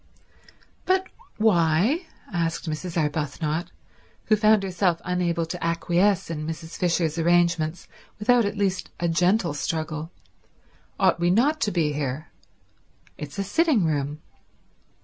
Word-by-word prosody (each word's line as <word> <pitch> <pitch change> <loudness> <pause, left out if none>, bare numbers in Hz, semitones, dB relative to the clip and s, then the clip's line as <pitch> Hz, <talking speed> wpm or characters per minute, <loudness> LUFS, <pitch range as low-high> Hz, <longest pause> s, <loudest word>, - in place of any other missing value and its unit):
"But 375 0 +2 0.3
why," 210 - +2 0.3
asked 165 -1 -1
Mrs. 160 +3 -4
Arbuthnot, 150 +2 -2 0.5
who 215 - +4
found 215 -1 +4
herself 180 -2 0
unable 175 -2 0
to 175 +2 -6
acquiesce 170 +3 +1
in 155 -1 -4
Mrs. 160 0 -6
Fisher's 170 -2 0
arrangements 170 -1 +1 0.3
without 240 +3 +3
at 205 0 -2
least 190 -2 -1
a 170 - 0
gentle 175 +1 +2
struggle, 155 +1 -3 0.9
"ought - - +3
we 175 0 +2
not 275 - +2
to 210 - +1
be 160 -4 +1
here? 145 0 -4 0.9
It's 150 +4 -7
a 200 - 0
sitting 285 - +2
room." 150 -1 -2
170 Hz, 125 wpm, -25 LUFS, 160-200 Hz, 0.9 s, who